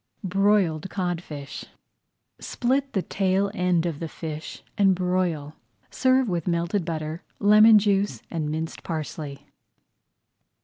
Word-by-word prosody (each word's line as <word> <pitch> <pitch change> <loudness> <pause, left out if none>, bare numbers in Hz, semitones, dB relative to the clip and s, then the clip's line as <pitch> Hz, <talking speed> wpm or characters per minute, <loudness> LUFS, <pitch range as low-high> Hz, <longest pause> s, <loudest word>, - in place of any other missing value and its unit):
BROILED 190 -3 +2
CODFISH 170 -6 -4 0.7
Split 270 +3 -1
the 190 - 0
tail 195 0 0
end 180 -4 +1
of 165 -4 -3
the 165 - -4
fish 155 -1 -7
and 195 -2 +4
broil. 180 -5 -1 0.4
Serve 260 -1 +3
with 175 -4 -2
melted 170 +3 0
butter, 160 0 -4 0.2
lemon 215 +2 +7
juice, 200 -1 +1
and 155 -3 -2
minced 160 +1 -4
parsley. 150 -3 -5
180 Hz, 115 wpm, -25 LUFS, 160-200 Hz, 0.7 s, lemon